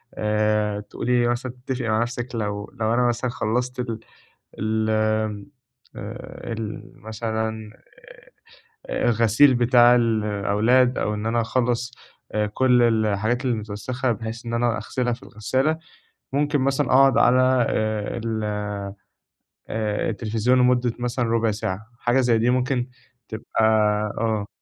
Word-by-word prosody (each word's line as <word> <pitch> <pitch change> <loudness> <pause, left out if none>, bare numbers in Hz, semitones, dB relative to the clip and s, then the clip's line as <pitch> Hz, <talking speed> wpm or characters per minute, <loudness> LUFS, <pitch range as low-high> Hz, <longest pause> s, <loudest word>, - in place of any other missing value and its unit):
آآ 105 -1 0
تقولي 120 +3 0
مثلًا 120 +1 -2
تتفقي 125 -3 -2
مع 110 +1 +2
نفْسِك 120 +1 -4
لو 105 -2 -3
لو 110 +1 +1
أنا 125 0 +3
مثلًا 120 +1 -1
خلّصت 125 +4 -2
ال 115 -3 -3 0.6
ال 110 +1 0
آمم، 110 -1 0 0.5
آآ، 115 - -7
المثلًا 110 0 -5 1.2
آآ - - -2
الغسيل 115 +4 +4
بتاع 120 0 +5
الأولاد 110 +2 +2
أو 105 - -1
إن 105 +1 -4
أنا 115 +1 +1
أخلّص 125 +1 -1 0.4
آآ 105 0 0
كلّ 125 +3 +3
الحاجات 110 +2 +1
المتوسخة 115 +3 -2
بحيث 115 +2 -6
إن 115 - -3
أنا 120 -1 +1
أغسلها 120 +3 -2
في 115 - -6
الغسالة، 130 +8 -1 0.5
ممكن 145 +1 +1
مثلًا 135 +1 +1
أقعد 135 +1 +5
على 130 -1 +4
آآ 110 0 -1
ال 110 -1 -2 1.3
آآ 105 0 -1
التليفزيون 115 +3 +1
لمدة 125 -1 +3
مثلًا 120 0 -1
ربع 115 -1 +1
ساعة، 105 0 -4
حاجة 120 +2 +2
زي 120 -3 +3
دي 120 +2 +2
ممكن 125 0 0 0.4
تبقى 110 0 -3 0.6
آه. 110 -2 -1
115 Hz, 125 wpm, -23 LUFS, 110-125 Hz, 1.3 s, بتاع